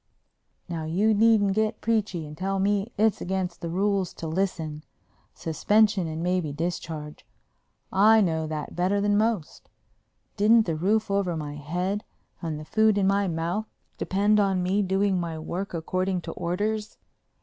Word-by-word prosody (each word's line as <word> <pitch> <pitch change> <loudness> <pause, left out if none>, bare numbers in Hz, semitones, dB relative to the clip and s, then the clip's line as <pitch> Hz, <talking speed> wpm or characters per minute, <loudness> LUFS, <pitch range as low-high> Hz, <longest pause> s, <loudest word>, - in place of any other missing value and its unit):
Now 165 -3 -4
you 200 +8 +2
needn't 210 -2 +4
get 215 +1 0
preachy 210 -7 -1
and 150 0 -9
tell 195 +4 -2
me 200 +3 0
it's 215 0 +2
against 185 -1 -3
the 170 - -4
rules 195 +1 0
to 165 - -6
listen—suspension 170 +3 -1
and 160 +1 -4
maybe 180 -4 0
discharge. 155 -1 -5 0.7
I 215 +3 +6
know 160 -5 +1
that 155 -2 -5
better 185 +3 +1
than 205 0 +2
most. 215 -6 -1 0.7
Didn't 220 +2 +5
the 165 - -1
roof 200 +6 +1
over 190 -4 0
my 150 -2 -5
head 180 +8 -3 0.4
and 160 -3 -3
the 155 - -8
food 220 +3 +3
in 200 - +2
my 200 +1 +2
mouth 175 +6 -2 0.3
depend 205 +2 +2
on 195 -3 +2
me 190 +3 +1
doing 195 0 +1
my 165 -2 -3
work 175 +5 -4
according 185 +2 -1
to - - -6
orders? 210 +5 -2
190 Hz, 150 wpm, -26 LUFS, 165-205 Hz, 0.7 s, I